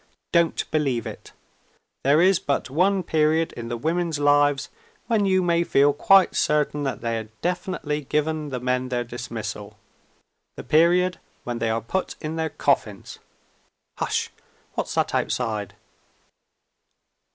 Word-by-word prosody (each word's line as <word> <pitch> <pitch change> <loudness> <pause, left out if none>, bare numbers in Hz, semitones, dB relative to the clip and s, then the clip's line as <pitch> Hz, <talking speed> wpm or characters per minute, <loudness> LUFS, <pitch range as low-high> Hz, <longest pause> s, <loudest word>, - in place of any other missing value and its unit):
Don't 170 -1 +2
believe 135 -7 0
it! - - -9 0.7
There 145 +5 +4
is 190 -1 +4
but 140 -6 -2
one 185 +5 +2
period 160 +1 +1
in 120 -1 -7
the 120 0 -3
women's 165 +3 -1
lives 145 -1 +3 0.4
when 215 -4 +1
you 185 -1 +3
may 170 -1 +2
feel 145 -3 +3
quite 195 +5 +4
certain 150 -1 +1
that 135 -2 -3
they 115 -1 -1
have 110 -1 -6
definitely 175 -4 -2
given 150 +1 -1
the 130 -2 -3
men 125 +1 -1
their 120 -1 -1
dismissal 120 +1 -7 0.8
the - - -6
period 175 +3 +3 0.2
when 120 -1 -4
they 115 - 0
are 115 +1 0
put 185 - -3
in 155 0 -4
their 160 -1 -1
coffins. 115 -9 -1 0.8
Hush! - - -1 0.4
What's - - -3
that - - 0
outside? 110 -5 -2
150 Hz, 140 wpm, -24 LUFS, 125-170 Hz, 0.8 s, There